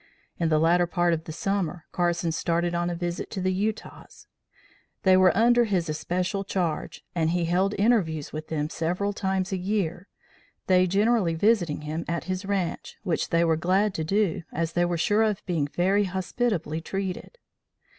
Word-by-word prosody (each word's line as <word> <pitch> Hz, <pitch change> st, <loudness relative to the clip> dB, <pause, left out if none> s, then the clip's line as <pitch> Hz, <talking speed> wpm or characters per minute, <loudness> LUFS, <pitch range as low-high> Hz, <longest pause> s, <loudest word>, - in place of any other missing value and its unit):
In 165 Hz, -2 st, +1 dB
the 155 Hz, -, +3 dB
latter 170 Hz, +3 st, +3 dB
part 175 Hz, 0 st, +1 dB
of 160 Hz, 0 st, -3 dB
the -, -, -6 dB
summer 180 Hz, -1 st, -2 dB
Carson 175 Hz, -1 st, 0 dB
started 170 Hz, +1 st, 0 dB
on 175 Hz, 0 st, 0 dB
a 175 Hz, -, -2 dB
visit 175 Hz, 0 st, -4 dB
to 200 Hz, -, -5 dB
the 185 Hz, 0 st, 0 dB
Utahs. 210 Hz, +3 st, -4 dB, 0.8 s
They 190 Hz, -1 st, +6 dB
were 185 Hz, -1 st, +6 dB
under 240 Hz, +2 st, +5 dB
his 180 Hz, -6 st, 0 dB
especial 180 Hz, +5 st, -2 dB
charge 180 Hz, -5 st, -3 dB
and 160 Hz, -2 st, +1 dB
he 175 Hz, 0 st, 0 dB
held 185 Hz, +4 st, +1 dB
interviews 195 Hz, -9 st, +1 dB
with 155 Hz, 0 st, -5 dB
them 150 Hz, -2 st, -2 dB
several 180 Hz, +5 st, -1 dB
times 190 Hz, -1 st, -1 dB
a 190 Hz, -, 0 dB
year, 185 Hz, -1 st, -2 dB, 0.6 s
they 185 Hz, -2 st, +4 dB
generally 200 Hz, -2 st, +2 dB
visiting 175 Hz, -5 st, +2 dB
him 155 Hz, +2 st, -4 dB
at 170 Hz, 0 st, -2 dB
his 185 Hz, +1 st, -4 dB
ranche, 195 Hz, -4 st, -2 dB
which 175 Hz, -5 st, -1 dB
they 170 Hz, 0 st, +3 dB
were 165 Hz, -1 st, +3 dB
glad 185 Hz, +5 st, +1 dB
to 160 Hz, -, -2 dB
do, 195 Hz, 0 st, +1 dB
as 165 Hz, 0 st, -2 dB
they 175 Hz, 0 st, +2 dB
were 175 Hz, 0 st, -1 dB
sure 205 Hz, +6 st, +2 dB
of 215 Hz, -2 st, 0 dB
being 165 Hz, -6 st, 0 dB
very 190 Hz, +7 st, +1 dB
hospitably 185 Hz, -3 st, -2 dB
treated. 195 Hz, -, -5 dB
180 Hz, 175 wpm, -26 LUFS, 165-195 Hz, 0.8 s, They